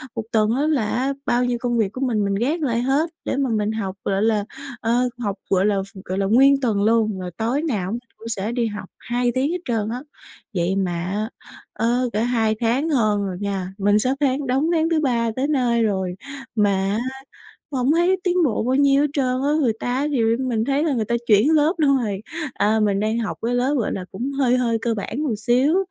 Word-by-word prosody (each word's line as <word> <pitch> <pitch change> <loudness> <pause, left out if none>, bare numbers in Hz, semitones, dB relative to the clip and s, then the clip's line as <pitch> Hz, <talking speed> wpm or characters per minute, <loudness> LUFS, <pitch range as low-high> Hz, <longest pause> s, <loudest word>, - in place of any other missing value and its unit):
Một 225 - -2
tuần 215 -1 +2
á 270 - 0
là 285 -8 +1
á 260 +6 0
bao 245 +1 +2
nhiêu 245 -1 0
công 240 -1 0
việc 210 -4 +1
của 255 - -6
mình 235 -6 +1
mình 200 0 0
gác 280 - 0
lại 240 -5 0
hết 275 +6 +1 0.2
để - - -1
mà 275 -2 +1
mình 215 -1 0
học, 200 -4 -3
gọi 195 +1 +1
là, 215 -2 +1 0.4
ờ, 240 +2 +1
học, 205 -5 -2
gọi 190 0 +3
là, 210 -1 +2 0.3
gọi 185 - -3
là, 195 0 +1
ph - - -2
nguyên 275 +3 +5
tuần 215 -6 +1
luôn, 215 -2 +2
rồi 180 -1 -5
tối 240 +6 0
nào 205 - -1
mình 235 - -2 0.2
cũng 225 - -10
sẽ 210 0 -2
đi 240 -1 0
học 205 -3 -7
2 245 0 0
tiếng 270 +4 +1
hết 360 - -2
trơn 220 -3 -1
á. 245 +2 -4 0.5
Vậy 175 +2 +1
mà 190 -2 0
á, 205 +5 -2 0.4
ờ, 245 +2 0
cỡ 210 - 0
2 225 -2 +1
tháng 250 +7 +1
hơn 215 -8 +2
rồi 185 -2 -4
nha, 195 -2 -3
mình 205 +1 +3
sắp 255 +5 +1
tháng 275 0 +1
đóng 270 +6 +1
tháng 325 -1 +2
thứ 325 -2 +2
ba 235 -5 +1
tới 265 +2 +1
nơi 245 -6 +2
rồi, 190 -4 -1 0.4
mà 205 -2 +3 0.3
á - - 0 0.7
hổng 260 0 +1
thấy 345 +4 +3
tiến 360 -1 +1
bộ 225 -6 0
bao 255 +3 +1
nhiêu 280 0 +4
hết - - +2
trơn 275 -3 +1 0.2
á, 285 +2 +1
người 240 -6 +2
ta - - -4
á 280 +3 0
thì 265 -5 +1 0.2
mình 240 -4 0
thấy 280 +3 +1
là 315 -3 +1
người 225 -4 0
ta 235 - 0
chuyển 220 +7 +5
lớp 310 +2 +4
luôn 280 -4 +3
rồi. 205 -6 -2 0.3
À, 210 +3 +2
mình 200 -2 +2
đang 220 +2 0
học 225 - -3
cái 245 +1 0
lớp, 255 +3 +1
gọi 225 - -1
là, 185 - -4
cũng 245 +8 -4
hơi 260 -3 +2
hơi 235 -2 +1
cơ 235 -1 0
bản 225 +7 -4
một 260 -8 0
xíu, 255 - +2
235 Hz, 240 wpm, -22 LUFS, 210-270 Hz, 0.7 s, nguyên